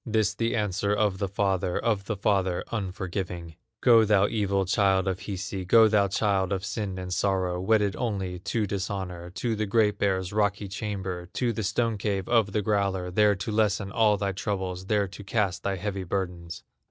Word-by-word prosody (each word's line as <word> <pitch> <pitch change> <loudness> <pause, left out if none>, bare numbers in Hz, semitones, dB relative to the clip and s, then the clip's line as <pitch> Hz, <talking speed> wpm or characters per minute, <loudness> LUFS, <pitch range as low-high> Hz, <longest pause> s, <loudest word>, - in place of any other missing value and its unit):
This 110 -3 +1
the 115 0 -1
answer 105 -1 0
of 105 -3 +1
the 100 - 0
father, 95 -2 0
Of 105 -4 0
the 105 - -2
father 95 -3 +1
unforgiving: 90 -4 -4 0.3
"Go, 115 -2 +6
thou 105 -2 +4
evil 100 -3 0
child 95 0 +2
of 95 -1 -1
Hisi, 95 0 -5
Go, 110 +5 +6
thou 105 -2 +3
child 100 -1 0
of 95 0 -1
sin 100 -3 -3
and 90 -1 -4
sorrow, 90 -2 0
Wedded 105 0 +2
only 95 -7 -3
to 110 +4 -1
dishonor, 95 -3 -4
To 110 +5 -2
the 110 0 -2
Great 105 -1 +2
Bear's 95 -2 0
rocky 105 -1 0
chamber, 95 -3 -4
To 120 -2 0
the 110 - -3
stone 110 +2 0
cave 100 -2 -1
of 115 -4 +3
the 105 +1 0
growler, 95 -3 0
There 105 +2 +4
to 100 +4 -4
lessen 105 -2 +1
all 105 -1 +3
thy 100 0 -1
troubles, 95 -2 -3
There 105 -1 +2
to 100 +2 -10
cast 100 -2 -1
thy 100 - -1
heavy 95 0 -3
burdens!" 85 -2 -4
100 Hz, 185 wpm, -27 LUFS, 95-105 Hz, 0.3 s, Go